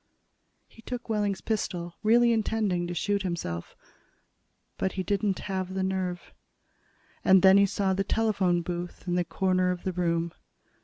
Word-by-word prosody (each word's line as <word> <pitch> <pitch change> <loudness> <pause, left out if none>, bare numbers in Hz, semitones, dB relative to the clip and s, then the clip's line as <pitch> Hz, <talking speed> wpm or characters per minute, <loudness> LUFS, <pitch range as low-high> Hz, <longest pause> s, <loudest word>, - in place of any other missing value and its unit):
He 225 - -17
took 245 +1 -6
Wehling's 205 -4 0
pistol, 175 -5 -3
really 235 +2 +5
intending 210 -5 0
to 175 - -4
shoot 200 +3 0
himself. 170 - -4 1.0
But 190 - 0
he 190 - -2
didn't 200 +1 0
have 190 -1 -3
the 190 - 0
nerve. 185 -2 -3 0.9
And 190 0 +6
then 190 0 +8
he 200 - +5
saw 195 0 0
the 195 +1 0
telephone 195 -5 +1
booth 175 +1 -6
in 175 - 0
the 180 0 +2
corner 185 0 +1
of 180 -1 -3
the 185 - -2
room. 170 -1 0
190 Hz, 155 wpm, -28 LUFS, 175-205 Hz, 1.0 s, then